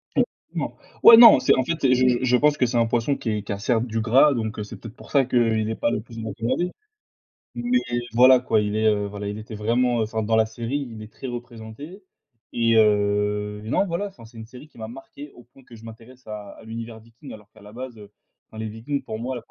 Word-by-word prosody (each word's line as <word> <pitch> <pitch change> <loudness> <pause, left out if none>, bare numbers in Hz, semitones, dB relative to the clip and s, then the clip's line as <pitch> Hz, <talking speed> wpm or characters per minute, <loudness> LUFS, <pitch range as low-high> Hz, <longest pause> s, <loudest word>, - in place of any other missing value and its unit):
Effectivement. - - -3 0.3
Ouais, 230 - +10
non, 230 -1 +9
c'est - - +3
en 130 - +2
fait, 165 - -1
c'est 130 -2 +4
je 130 0 +3
je 125 -1 +3
je 125 -1 +3
pense 150 +2 +2
que 125 - +2
c'est 120 0 -1
un 115 - +3
poisson 120 +4 0
qui 115 - -5
est 105 -2 -2
qui 105 - -7
a, 100 - -3
certes, 115 +2 0
du 115 -2 -3
gras 130 +6 +4
donc 110 -2 -4
heu, - - -3
c'est 105 - -10
peut-être 115 -1 -11
pour - - -15
ça 140 -2 +3
qu'il 115 -3 +1
est 110 - -2
pas 115 - -1
le 105 - -2
plus 115 0 -10
recommandé. 115 - -2 0.8
Mais 245 +1 +1 0.3
voilà, 125 +2 +6
quoi, 115 -3 +1
il 105 0 -2
est, 110 0 +1
heu, 105 -1 +1
voilà, 100 0 -6
il 105 +1 -5
était 110 +2 -10
vraiment, 120 +3 0
heu, - - +2
enfin, 110 0 -3
dans 110 +1 +1
la 110 0 +4
série, 120 +5 -4
il 110 -2 -10
est 110 - -13
très 135 - -8
représenté 120 - -9 0.5
et 115 -1 +1
heu, 105 -1 +1
et 110 - -8
non, 195 - +1
voilà, 190 +3 -3
enfin, 125 - -14
c'est 115 +1 -16
une 110 - -8
série 125 +5 -13
qui 150 - -24
m'a 110 - -6
marqué 135 +4 -11
au 120 - -15
point 120 +3 -22
que 120 - -15
je 110 - -15
m'intéresse 115 +3 -14
à 105 -1 -8
à - - -15
l'univers 115 0 -8
Viking, 115 +5 -14
alors 105 -1 -14
qu'à 110 - -19
la 105 0 -13
base, 125 0 -8
heu, 105 -1 -14 0.4
enfin, 110 - -12
les 110 - -4
Vikings, 120 +7 -4
pour 110 - -6
moi, 125 +2 -4
115 Hz, 260 wpm, -23 LUFS, 110-130 Hz, 0.8 s, Ouais